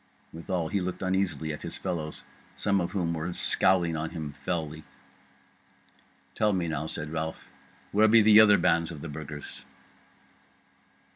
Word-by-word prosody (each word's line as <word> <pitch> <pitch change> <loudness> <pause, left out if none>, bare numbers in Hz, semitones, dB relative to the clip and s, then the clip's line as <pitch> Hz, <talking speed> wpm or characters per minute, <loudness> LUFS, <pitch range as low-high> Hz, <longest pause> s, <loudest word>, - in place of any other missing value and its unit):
Withal 85 0 -3
he 100 - 0
looked 90 +1 -4
uneasily 90 -5 -1
at 75 - -8
his - - -5
fellows, 80 -5 -4 0.3
some 100 -2 +1
of 85 - -3
whom 85 -4 -1
were 80 +2 -3
scowling 85 -2 +2
on 80 0 -3
him 80 -4 -6
felly. 80 +2 -4 1.5
"Tell 105 -1 +1
me 90 -3 -1
now," 80 -1 -3
said 75 -1 -4
Ralph, 80 0 -4 0.5
"where 105 +2 +5
be 110 0 +6
the 105 0 +8
other 105 -2 +7
bands 85 0 +2
of 80 -4 -8
the 85 - -6
Burgers?" 75 0 -8
85 Hz, 150 wpm, -28 LUFS, 80-95 Hz, 1.5 s, the